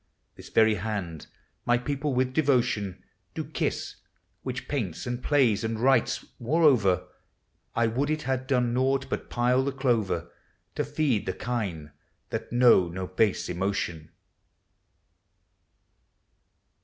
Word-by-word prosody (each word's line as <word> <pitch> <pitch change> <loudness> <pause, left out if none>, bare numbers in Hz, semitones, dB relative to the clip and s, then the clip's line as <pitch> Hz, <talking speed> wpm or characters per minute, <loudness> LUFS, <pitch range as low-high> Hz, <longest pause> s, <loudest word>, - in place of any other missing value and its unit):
This - - -12
very 110 -1 +4
hand 95 -6 -4 0.4
my 120 0 +3
people 140 +3 -2
with 130 0 +1
devotion 120 - +1 0.3
Do - - -2
kiss, - - -3 0.2
— - - -46
which 130 0 -5
paints 105 - -3
and 125 0 -3
plays 130 -9 +3
and 110 0 -2
writes, 130 -1 +2
moreover, 125 - +3 0.3
— - - -44
I 115 - +3
would 130 +6 0
it 155 0 -1
had 130 -1 -2
done 125 -3 +1
naught 135 +2 +1
but - - -3
pile 125 +2 +2
the 140 - -1
clover 110 - 0 0.4
To - - -1
feed 135 -9 0
the 95 - 0
kine 95 -12 -4 0.4
that - - -4
know 120 -7 +5
no 90 +2 -4
base 95 +2 +1
emotion 90 -3 -2
120 Hz, 130 wpm, -27 LUFS, 100-130 Hz, 0.4 s, know